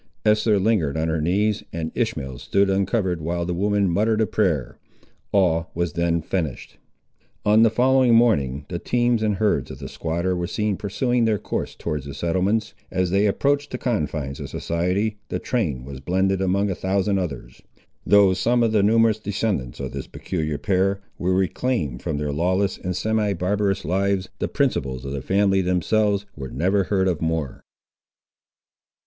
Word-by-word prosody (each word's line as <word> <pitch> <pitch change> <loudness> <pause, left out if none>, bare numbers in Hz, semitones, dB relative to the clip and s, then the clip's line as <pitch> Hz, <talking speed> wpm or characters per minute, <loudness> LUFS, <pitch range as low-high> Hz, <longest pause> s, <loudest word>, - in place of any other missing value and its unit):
Esther 105 0 +3
lingered 95 -8 +1
on 80 +1 0
her 80 -1 0
knees, 105 +6 +1
and 80 -1 -4
Ishmael 65 -2 -2
stood 100 0 +1
uncovered 95 -3 0
while 85 +2 -2
the 90 - -2
woman 100 +2 +1
muttered 105 +5 +1
a 110 - +3
prayer. 85 - -1 0.5
All 85 -4 +2
was 85 -2 -1
then 85 -1 0
finished. 80 -7 -4 0.7
On 105 +1 +5
the 115 - +6
following 125 +1 +4
morning 75 - +2
the 85 - -4
teams 120 +1 +1
and 105 -2 +1
herds 105 +2 +1
of - - -8
the - - -7
squatter 85 +3 -2
were 90 -1 -2
seen 105 +2 -1
pursuing 120 +5 0
their 110 -2 +2
course - - -4
towards 75 -2 -4
the 70 - -7
settlements. 95 +6 0 0.2
As 95 -1 0
they 100 +2 +3
approached 145 +7 +1
the 125 - -4
confines 75 - -2
of - - -6
society 90 +6 -1
the - - -1
train 75 - -2
was 70 -1 -8
blended 95 +5 0
among 95 +2 +1
a - - 0
thousand 95 +2 0
others. 70 -9 -6 0.4
Though 100 -2 +5
some 120 +6 +2
of 115 - +2
the 110 -2 +3
numerous 110 +1 +3
descendants 100 - -2
of - - -4
this - - -6
peculiar 80 -5 -3
pair 95 +1 +1 0.2
were 90 +1 +1
reclaimed 95 - -1
from - - -2
their 75 0 -2
lawless 95 +5 0
and 90 0 -3
semi 110 +1 0
barbarous 100 +1 0
lives, 95 +1 0
the - - 0
principals 65 -1 -1
of 70 - -4
the 70 -1 -3
family, 95 +4 +2
themselves, 100 +3 +1
were 65 -2 -6
never 95 +9 +1
heard 95 0 +1
of 85 -4 -1
more. 80 -4 -2
95 Hz, 170 wpm, -23 LUFS, 85-105 Hz, 0.7 s, the